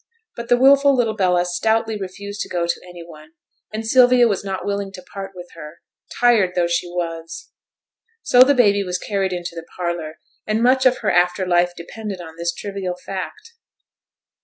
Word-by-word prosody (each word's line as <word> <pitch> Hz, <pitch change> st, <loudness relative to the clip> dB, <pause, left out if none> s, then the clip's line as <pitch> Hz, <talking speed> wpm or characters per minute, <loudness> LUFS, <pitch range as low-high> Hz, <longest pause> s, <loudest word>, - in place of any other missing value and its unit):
But 235 Hz, 0 st, -7 dB
the 245 Hz, -, +5 dB
wilful 275 Hz, +2 st, +5 dB
little 230 Hz, -4 st, 0 dB
Bella 180 Hz, -3 st, +2 dB
stoutly 220 Hz, +5 st, 0 dB
refused 200 Hz, +1 st, -7 dB
to -, -, -5 dB
go 175 Hz, -1 st, -1 dB
to 170 Hz, -, -2 dB
any 175 Hz, -1 st, -10 dB
one, 155 Hz, -1 st, -15 dB, 0.4 s
and 220 Hz, +1 st, -5 dB
Sylvia 245 Hz, +1 st, +5 dB
was 200 Hz, -3 st, -1 dB
not 195 Hz, -1 st, -4 dB
willing 200 Hz, -1 st, -3 dB
to 185 Hz, -, -10 dB
part 195 Hz, +1 st, -8 dB
with 175 Hz, -1 st, -10 dB
her, 150 Hz, +2 st, -11 dB, 0.4 s
tired 225 Hz, -7 st, +4 dB
though 175 Hz, -1 st, +2 dB
she 170 Hz, +1 st, -1 dB
was. 165 Hz, -2 st, -6 dB, 0.7 s
So 245 Hz, -, +5 dB
the 280 Hz, +2 st, +6 dB
baby 205 Hz, -5 st, +3 dB
was 180 Hz, -1 st, -2 dB
carried 195 Hz, -1 st, -2 dB
into 175 Hz, -1 st, -4 dB
the 165 Hz, -1 st, -9 dB
parlour, 170 Hz, -3 st, -4 dB, 0.3 s
and 215 Hz, +2 st, 0 dB
much 260 Hz, +1 st, +4 dB
of 255 Hz, -, +2 dB
her -, -, +3 dB
after 180 Hz, +2 st, +2 dB
life 175 Hz, 0 st, +2 dB
depended 200 Hz, +3 st, -7 dB
on 160 Hz, -2 st, -10 dB
this 170 Hz, +1 st, -2 dB
trivial 195 Hz, -1 st, -5 dB
fact. 425 Hz, -, -7 dB
190 Hz, 185 wpm, -20 LUFS, 175-225 Hz, 0.7 s, the